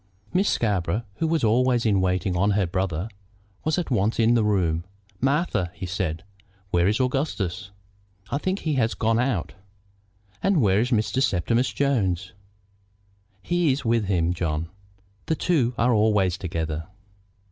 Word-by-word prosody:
Miss 195 Hz, +2 st, +2 dB
Scarborough, 100 Hz, -1 st, 0 dB
who 165 Hz, -, 0 dB
was 160 Hz, -3 st, 0 dB
always 120 Hz, +2 st, +3 dB
in 100 Hz, -4 st, +3 dB
waiting 95 Hz, 0 st, 0 dB
on 100 Hz, +4 st, +2 dB
her 100 Hz, -, +2 dB
brother, 90 Hz, 0 st, -2 dB, 0.6 s
was 155 Hz, +2 st, 0 dB
at 175 Hz, -5 st, -2 dB
once 110 Hz, -1 st, +1 dB
in 115 Hz, +1 st, +4 dB
the 115 Hz, -2 st, +3 dB
room. 90 Hz, -6 st, +1 dB, 0.4 s
"Martha," 135 Hz, -, +1 dB
he 95 Hz, -, -5 dB
said, 90 Hz, -4 st, -3 dB, 0.5 s
"where 85 Hz, +1 st, +3 dB
is 105 Hz, +4 st, +1 dB
Augustus?" 110 Hz, -, -1 dB, 0.6 s
"I 140 Hz, -, 0 dB
think 185 Hz, +4 st, -2 dB
he 155 Hz, -, -1 dB
has 120 Hz, -4 st, +1 dB
gone 115 Hz, +1 st, +1 dB
out." 120 Hz, -9 st, -1 dB, 0.9 s
"And 195 Hz, -4 st, +2 dB
where 100 Hz, -5 st, +3 dB
is 120 Hz, +3 st, +1 dB
Mr. 120 Hz, +2 st, +1 dB
Septimus 115 Hz, +4 st, +1 dB
Jones?" 100 Hz, -9 st, 0 dB, 1.1 s
"He 175 Hz, -4 st, +2 dB
is 130 Hz, 0 st, -2 dB
with 115 Hz, -2 st, +2 dB
him, 90 Hz, -3 st, +1 dB
John. 80 Hz, -2 st, -2 dB, 0.6 s
The 160 Hz, -, +1 dB
two 135 Hz, -9 st, +1 dB
are 125 Hz, +2 st, +3 dB
always 105 Hz, -5 st, +3 dB
together." 80 Hz, -3 st, -4 dB
110 Hz, 150 wpm, -24 LUFS, 90-130 Hz, 1.1 s, in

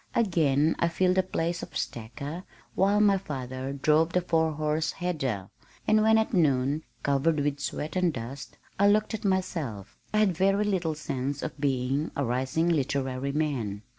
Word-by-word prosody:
Again 160 Hz, -8 st, +2 dB
I 170 Hz, -, +3 dB
filled 180 Hz, +2 st, +2 dB
the -, -, +6 dB
place 170 Hz, -2 st, -2 dB
of -, -, -6 dB
stacker 140 Hz, +9 st, -5 dB, 0.3 s
while 200 Hz, +2 st, +3 dB
my 200 Hz, -2 st, +4 dB
father 130 Hz, -5 st, -5 dB
drove 155 Hz, +4 st, +2 dB
the 180 Hz, -, +3 dB
four 160 Hz, -2 st, +1 dB
horse 155 Hz, +1 st, -1 dB
header, 135 Hz, -, -3 dB, 0.4 s
and 215 Hz, 0 st, +5 dB
when 220 Hz, +1 st, +5 dB
at 220 Hz, -, 0 dB
noon, 145 Hz, -3 st, +2 dB, 0.2 s
covered 145 Hz, +3 st, +2 dB
with 145 Hz, 0 st, -1 dB
sweat 150 Hz, +1 st, -4 dB
and 180 Hz, -2 st, +2 dB
dust, 130 Hz, +1 st, -7 dB, 0.2 s
I 200 Hz, -, +5 dB
looked 215 Hz, +2 st, +3 dB
at 220 Hz, -, -4 dB
myself, 170 Hz, -, -2 dB
I 215 Hz, -, 0 dB
had 205 Hz, -4 st, +3 dB
very 195 Hz, +4 st, +2 dB
little 180 Hz, -6 st, 0 dB
sense 140 Hz, -1 st, -3 dB
of 150 Hz, -2 st, -6 dB
being 135 Hz, +2 st, 0 dB
a 140 Hz, -, 0 dB
"rising 130 Hz, +7 st, 0 dB
literary 140 Hz, -4 st, 0 dB
man." 130 Hz, -9 st, -2 dB
155 Hz, 165 wpm, -28 LUFS, 135-180 Hz, 0.4 s, the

